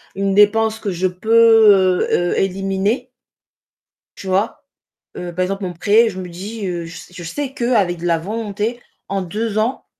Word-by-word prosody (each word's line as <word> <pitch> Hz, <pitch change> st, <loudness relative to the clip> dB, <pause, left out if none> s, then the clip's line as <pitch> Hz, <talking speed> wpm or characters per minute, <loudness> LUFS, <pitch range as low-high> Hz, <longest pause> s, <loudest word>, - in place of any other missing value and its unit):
une 195 Hz, 0 st, 0 dB
dépense 220 Hz, +2 st, +3 dB
que 210 Hz, -, -4 dB
je 185 Hz, +2 st, 0 dB
peux, 210 Hz, -1 st, +4 dB
heu 175 Hz, 0 st, +1 dB
heu, -, -, -2 dB
éliminer 195 Hz, +5 st, -1 dB, 1.1 s
tu -, -, -9 dB
vois? 215 Hz, +10 st, -1 dB, 0.5 s
Heu, 175 Hz, -1 st, -6 dB
par 185 Hz, -, -1 dB
exemple 195 Hz, +1 st, -2 dB
mon 180 Hz, -, -4 dB
prêt, 210 Hz, +7 st, +3 dB
je 190 Hz, -3 st, -6 dB
me 180 Hz, -, -7 dB
dis, 200 Hz, +5 st, -6 dB
heu, 175 Hz, -2 st, -3 dB
je 165 Hz, -, -10 dB
s -, -, -12 dB
je 180 Hz, -, -8 dB
sais 270 Hz, -, -4 dB
qu'avec 215 Hz, -9 st, +1 dB
de 175 Hz, -, -5 dB
la 170 Hz, -1 st, +2 dB
volonté, 215 Hz, +5 st, -4 dB, 0.3 s
en 195 Hz, 0 st, -2 dB
2 215 Hz, +4 st, -3 dB
ans 230 Hz, +5 st, -1 dB
195 Hz, 180 wpm, -19 LUFS, 180-225 Hz, 1.1 s, peux